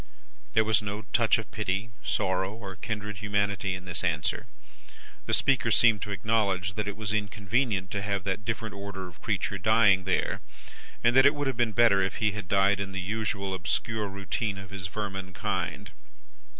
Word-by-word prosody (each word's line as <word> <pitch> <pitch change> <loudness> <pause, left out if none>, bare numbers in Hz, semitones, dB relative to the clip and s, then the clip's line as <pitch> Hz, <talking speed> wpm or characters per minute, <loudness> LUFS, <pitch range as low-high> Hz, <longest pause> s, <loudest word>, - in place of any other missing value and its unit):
"There 110 - +5
was 110 -1 +3
no 105 +1 -4
touch 120 -2 +4
of 115 - -7
pity, 105 +1 -2
sorrow, 95 +1 0
or 100 -4 -8
kindred 105 0 -4
humanity, 100 0 0
in 90 -1 -8
this 90 -1 -1
answer. - - -1 0.8
The - - -1
speaker 130 -4 +2
seemed 110 0 +5
to 105 - -4
acknowledge 100 -3 0
that 105 0 -3
it 100 - -4
was 105 -2 -2
inconvenient 105 -1 0
to 100 - -2
have 100 -1 -1
that 100 +2 -2
different 115 -1 -3
order 100 -2 -6
of 85 - -15
creature 100 -2 -1
dying 100 -2 +4
there, 95 - 0 0.6
and 120 +1 +4
that 130 +1 +8
it 145 - +3
would 145 0 -2
have 135 -2 0
been 120 -3 +1
better 115 -3 +5
if 95 0 -1
he 110 -1 +1
had 100 -3 -6
died 100 +1 +3
in 95 -1 -4
the 95 - -3
usual 100 0 -2
obscure 105 +5 -1
routine 100 +1 -3
of 95 -1 -9
his 95 -2 -4
vermin 95 -1 -5
kind. - - -3
100 Hz, 185 wpm, -28 LUFS, 95-110 Hz, 0.8 s, that